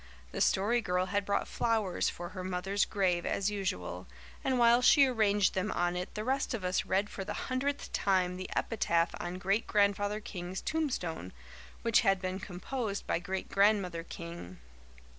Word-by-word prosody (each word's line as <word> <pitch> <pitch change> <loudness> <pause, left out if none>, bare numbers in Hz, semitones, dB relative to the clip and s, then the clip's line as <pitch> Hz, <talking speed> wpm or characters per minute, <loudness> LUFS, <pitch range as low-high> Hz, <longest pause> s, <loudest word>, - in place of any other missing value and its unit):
The - - -4
Story 225 +5 +3
Girl 180 -2 0
had 205 0 +1
brought 200 - 0
flowers 220 -6 0
for 175 0 -7
her 185 0 -7
mother's 190 +2 0
grave 180 -4 +1
as 200 +1 0
usual, 90 - -3 0.4
and 260 -1 +1
while 240 0 +5
she 280 +3 +7
arranged 210 -6 +2
them 190 +3 -1
on 175 0 0
it 180 +1 -5
the 215 - -3
rest 265 +1 0
of 210 - -6
us 180 0 0
read 195 +2 +1
for 195 - -6
the - - -5 0.2
hundredth 280 +2 -2
time 185 -2 +1
the 185 0 -6
epitaph 170 -6 +1
on 175 +1 -4
Great 195 +4 0
Grandfather 205 0 +2
King's 185 -3 -6
tombstone, 180 - -2 0.5
which 230 0 +4
had 195 -4 +3
been 185 0 -3
composed 200 +3 -4
by - - 0
Great 190 +1 -4
Grandmother 195 -4 +2
King. 170 - -8
195 Hz, 170 wpm, -31 LUFS, 180-215 Hz, 0.5 s, she